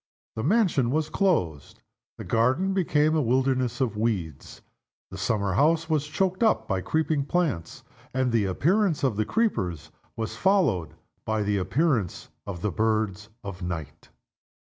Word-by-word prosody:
The 110 - -3
mansion 175 - +2
was 155 +3 -1
closed. 90 - 0 0.4
The - - -7
garden 130 +12 +1
became 155 -4 +2
a 155 - +3
wilderness 130 0 +1
of 120 -6 0
weeds. 100 -10 -3 0.5
The 95 - -7
summer 100 -1 0
house 160 - +2
was 150 -2 +1
choked 185 +6 -1
up 220 -2 +2
by 95 -2 -1
creeping 155 - 0
plants; 145 - -2 0.3
and 130 -1 0
the 115 -3 +2
appearance 170 - +1
of 130 -6 +2
the 110 +1 0
creepers 90 - -1 0.2
was 110 -1 -4
followed 150 - +1 0.3
by 110 -1 -1
the 105 0 0
appearance 110 - 0 0.2
of 90 -4 -6
the 105 - 0
birds 110 0 -1
of 100 -2 -7
night. 85 -5 -6
120 Hz, 145 wpm, -26 LUFS, 100-160 Hz, 0.5 s, a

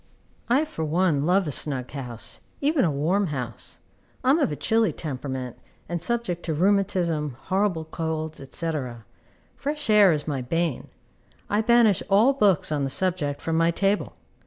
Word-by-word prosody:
I, 270 +6 +3
for 160 - -5
one, 155 -2 +1
love 185 0 +3
a - - -2
snug 130 -3 -1
house, 125 -5 -6 0.2
even 290 0 +2
a - - +2
warm 175 +8 +1
house. 125 -7 -5 0.5
I 255 - +4
am 305 - +4
of 290 - +1
a - - -2
chilly 225 +3 +2
temperament, 130 -4 -5 0.3
and 170 -1 -3
subject 225 -4 -1
to 160 - -1
rheumatism, 175 -6 +1
horrible 185 -1 0
colds, 160 -1 -4
&c. 165 -1 -1 0.8
Fresh 295 -2 -3
air 205 -3 +7
is 150 -1 -2
my 140 -4 -2
bane. 165 +2 -1 0.6
I 205 +1 +3
banish 225 -4 +4
all 215 +7 +5
books 205 - +2
on 145 -2 0
the 135 - -1
subject 165 -4 -1
from 165 - -1
my 165 0 +4
table. 195 +4 0
170 Hz, 160 wpm, -25 LUFS, 150-205 Hz, 0.8 s, air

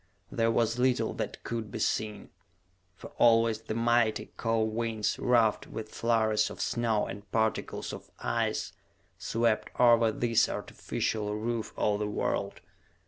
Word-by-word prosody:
There 115 0 +1
was 115 +1 +1
little 125 0 +2
that - - -5
could 115 -2 -4
be 110 - -6
seen, 110 -1 -2 0.6
for - - -11
always 115 -1 +4
the 110 -1 -5
mighty, 115 -1 +1
cold 110 -1 0
winds, 110 -2 -1
ruffed 115 -3 +2
with 110 -1 -7
flurries 110 -2 +2
of - - -10
snow 115 -3 0
and 100 -1 -9
particles 110 -1 -1
of - - -9
ice, - - -1 0.5
swept 115 -1 0
over 115 -2 +5
this 115 +1 +2
artificial 105 -1 -3
roof 115 +1 -3
of 105 -1 +1
the 105 - -1
world. 105 - -2
115 Hz, 140 wpm, -29 LUFS, 110-115 Hz, 0.6 s, over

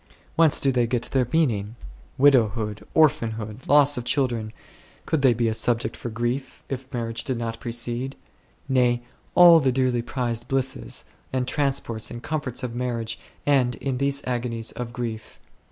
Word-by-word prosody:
Whence 160 -3 +4
do 135 - +2
they 120 -2 +1
get 120 0 -1
their 130 -3 +2
meaning? 115 -9 +1 0.4
"Widowhood," 110 -6 +3
"orphanhood," 115 -7 +1
"loss 145 0 +6
of 120 - -3
children," 120 -4 0 0.5
could 160 - 0
they 130 -3 +5
be 115 0 +1
a 110 - +1
subject 120 +1 0
for 120 - -6
grief, 120 +4 -3
if 130 0 -6
marriage 115 -2 -3
did 130 -3 -2
not 115 -1 -4
precede? 120 +3 -2 0.5
Nay, 125 -2 +2 0.3
all 175 -2 +9
the 135 -4 +2
dearly 125 -2 +1
prized 120 -1 -3
blisses, 130 - -2 0.3
and 130 -1 -1
transports, 135 -7 -1
and 120 0 -8
comforts 150 -6 -3
of 120 -2 -3
marriage 120 -2 -3 0.3
end 130 -4 +3
in 130 -2 -3
these 140 0 0
agonies 120 -2 -2
of 120 -1 -6
grief. 115 -2 -6
125 Hz, 155 wpm, -24 LUFS, 115-135 Hz, 0.5 s, all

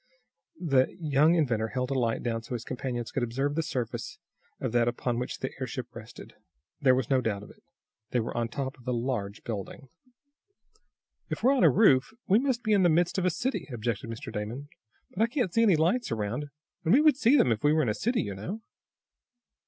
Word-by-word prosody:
The 135 -4 +2
young 155 +1 +3
inventor 120 -9 +1
held 125 +2 -3
the - - 0
light 120 -4 0
down 115 -1 -1
so 115 +2 -6
his 115 - -5
companions 125 -2 -4
could 135 - -2
observe 135 +5 -1
the 165 - 0
surface 130 -8 -4 0.4
of - - -2
that 120 0 +2
upon 120 0 -1
which 125 - -4
the 130 - -4
airship 125 -1 -5
rested. 110 - -11 0.5
There 130 -3 +5
was 130 0 -2
no 130 -1 +4
doubt 105 -4 -2
of - - -12
it. - - -21 0.5
They 125 - +1
were 115 - -3
on 120 -1 0
top 135 +1 -5
of 120 - -18
a 125 - +1
large 115 -4 -3
building. 115 - -6 1.4
"If - - -4
we're 260 +3 +5
on 260 - +2
a - - +8
roof 195 -2 +4
we 205 +3 +5
must 255 -2 -1
be 215 - +2
in 200 - +4
the 175 - +5
midst 175 +3 +2
of 185 - -1
a - - +4
city," 255 +10 -2
objected 115 -1 -3
Mr. 115 0 -7
Damon. 115 +8 -5 0.4
"But 190 - -4
I 225 - +5
can't 235 - -1
see 230 - +3
any 210 -6 +5
lights 175 - +1
around, 115 +6 -2 0.4
and 165 - +3
we 285 - +6
would 305 -3 +5
see 275 +1 +4
them 125 - +4
if 110 -2 -1
we 145 - +5
were 155 0 +3
in 120 - 0
a - - +1
city, 240 - 0
you 100 - -4
know." 145 - -6
130 Hz, 220 wpm, -28 LUFS, 115-175 Hz, 1.4 s, a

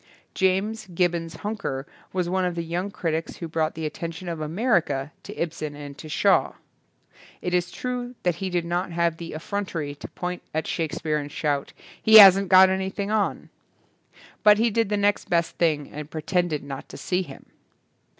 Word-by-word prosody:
James 195 +3 0
Gibbons 170 -2 -1
Huneker 205 -11 -3 0.3
was 180 -2 -1
one 185 +1 0
of 180 -1 -1
the 170 - -2
young 175 +4 -3
critics 165 -5 -3
who 170 - -6
brought 160 -1 -1
the 160 0 -4
attention 165 +3 -5
of 165 -2 -4
America 155 - 0
to - - -9
Ibsen 155 -3 -3
and 145 -1 -8
to 155 - -9
Shaw. 195 +5 +3 0.9
It 180 - -3
is 180 0 +1
true 250 +3 -4
that 175 -2 +1
he 190 +1 -3
did 175 -2 -1
not 175 +2 -1
have 170 -1 0
the 165 0 -7
affrontery 160 -3 -3
to - - -7
point 180 0 -5
at 160 - 0
Shakespeare 160 -1 -1
and 145 0 -6
shout, 145 -2 -1 0.3
"He 220 - +5
hasn't 195 -2 +9
got 190 0 +8
anything 190 +2 -2
on", 215 -2 -1 0.9
but 210 -1 +7
he 230 +1 +2
did 225 -1 +1
the 210 - +1
next 205 0 +1
best 170 -1 0
thing 155 -4 +1
and 150 0 -7
pretended 160 -1 -1
not 140 -1 -7
to - - -9
see 180 0 -1
him. 140 -7 -10
175 Hz, 180 wpm, -25 LUFS, 160-190 Hz, 0.9 s, hasn't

